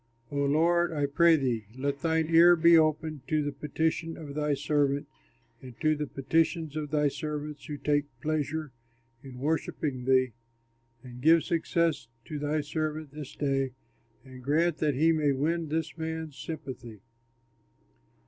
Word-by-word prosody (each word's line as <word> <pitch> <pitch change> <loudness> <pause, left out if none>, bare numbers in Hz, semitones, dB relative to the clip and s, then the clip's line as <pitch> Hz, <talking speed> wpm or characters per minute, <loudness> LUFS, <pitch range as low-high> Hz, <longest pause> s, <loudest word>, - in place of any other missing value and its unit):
O - - -6
Lord, 165 +5 +2
I 145 -2 0
pray 165 +4 +5
thee, 120 -8 -1
let 140 +1 -2
thine 160 0 +1
ear 170 +2 +8
be 170 0 +6
open 155 -2 +2
to 155 -1 +1
the 145 - -2
petition 160 +3 -2
of 145 -3 -8
thy 150 0 0
servant 145 0 0 0.5
and 125 -3 -12
to 155 -1 +2
the 150 0 -3
petitions 160 +3 0
of 150 -1 -3
thy 150 0 +2
servants 150 0 -5
who 150 - -5
take 145 0 +1
pleasure 155 +1 -2 0.5
in 135 -2 -11
worshipping 140 -2 -2
thee, 130 -1 +3 0.7
and 125 -1 -10
give 160 +3 +5
success 165 -5 0 0.2
to 150 - -5
thy 150 +1 0
servant 155 0 -3
this 150 -2 -9
day, 135 -2 0 0.5
and 130 -1 -12
grant 155 +5 +1
that 150 -3 +1
he 160 +5 +4
may 150 -3 +2
win 160 +4 -1
this 160 0 -2
man's 160 -2 -5
sympathy." 130 - -8
150 Hz, 150 wpm, -28 LUFS, 140-160 Hz, 0.7 s, ear